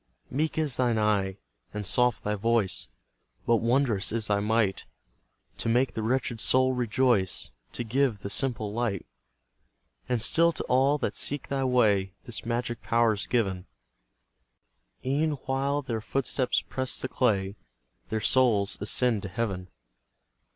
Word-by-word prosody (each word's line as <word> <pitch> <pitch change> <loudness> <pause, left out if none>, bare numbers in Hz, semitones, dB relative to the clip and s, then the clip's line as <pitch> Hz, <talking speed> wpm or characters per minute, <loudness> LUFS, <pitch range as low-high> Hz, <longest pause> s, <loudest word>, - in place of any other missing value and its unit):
Meek 155 +5 -1
is 150 -5 0
thine 120 -3 +2
eye 100 -3 +1 0.4
and 105 -1 -3
soft 125 +4 +2
thy 105 - -1
voice, 100 - 0 0.6
But 115 - +4
wondrous 115 -3 +1
is 115 -1 +2
thy 100 0 +1
might, 105 -1 0 0.7
To - - -1
make 125 +3 +2
the 110 - -3
wretched 120 0 -1
soul 130 0 +3
rejoice, 120 -4 +1 0.2
To 120 - -3
give 120 -2 0
the 100 - -5
simple 110 -5 0
light! 115 -5 -2 1.0
And 125 -2 +1
still 165 +9 +4
to - - -3
all 135 +3 +3
that - - -2
seek 145 0 -1
thy 135 -1 -1
way 105 -7 +2
This 120 -2 -7
magic 120 0 -2
power 115 -2 +2
is 100 - -4
given, 95 -7 -1 1.4
E'en 150 +4 +1
while 140 +2 0
their 115 -4 -3
footsteps 130 +1 0
press 130 -1 -2
the - - -2
clay, 100 -7 0 0.5
Their 110 0 -2
souls 105 -5 +3
ascend 115 +1 +1
to 100 - -6
heaven. 95 -3 -3
115 Hz, 145 wpm, -27 LUFS, 105-130 Hz, 1.4 s, But